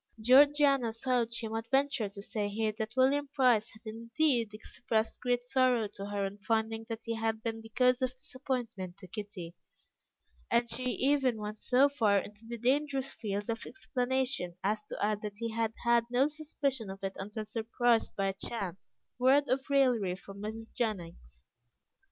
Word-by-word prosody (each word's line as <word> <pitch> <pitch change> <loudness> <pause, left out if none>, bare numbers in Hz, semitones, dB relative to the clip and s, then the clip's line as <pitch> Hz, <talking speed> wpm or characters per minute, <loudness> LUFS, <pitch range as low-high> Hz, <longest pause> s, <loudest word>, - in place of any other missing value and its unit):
Georgiana 275 +1 +5
thought 235 0 0
she 235 -1 -3
might 225 +1 -4
venture 270 -5 +2
to 200 0 -9
say 210 -1 -2
here 215 +1 0
that 220 +2 -5
William 280 +3 +3
Price 245 -6 +4
had 220 - -16
indeed 230 +2 +1
expressed 220 +1 -2
great 245 -1 0
sorrow 250 -3 +2
to 200 0 -7
her 205 -1 -1
on 195 +1 -6
finding 225 +2 -1
that 225 0 -5
he 230 - -2
had 225 0 -1
been 225 -1 -3
the 225 - -12
cause 250 +2 +3
of 255 - +2
disappointment 240 -8 -4
to 200 - -12
Kitty, 190 -3 -7 1.0
and 235 0 +3
she 235 +2 -3
even 260 -1 +2
went 210 0 -5
so 260 +2 +4
far 225 -8 +2
into 210 +3 -5
the 235 0 -5
dangerous 270 +2 0
fields 205 -2 -3
of 230 -1 -3
explanation 255 - -1
as 210 +2 0
to - - -7
add 210 0 0
that 210 -1 -6
he 230 +1 -3
had 225 0 -1
had 235 -1 +4
no 250 +3 +3
suspicion 285 -6 -2
of 195 +1 -8
it 195 0 -2
until 210 +2 -5
surprised 230 +1 +1
by 195 - 0
a - - -2
chance 195 -2 -5 0.2
word 275 +3 +5
of 265 +2 0
raillery 245 -10 +3
from 195 +2 -11
Mrs. 225 +2 -6
Jennings. 170 - -4
225 Hz, 175 wpm, -31 LUFS, 210-255 Hz, 1.0 s, Georgiana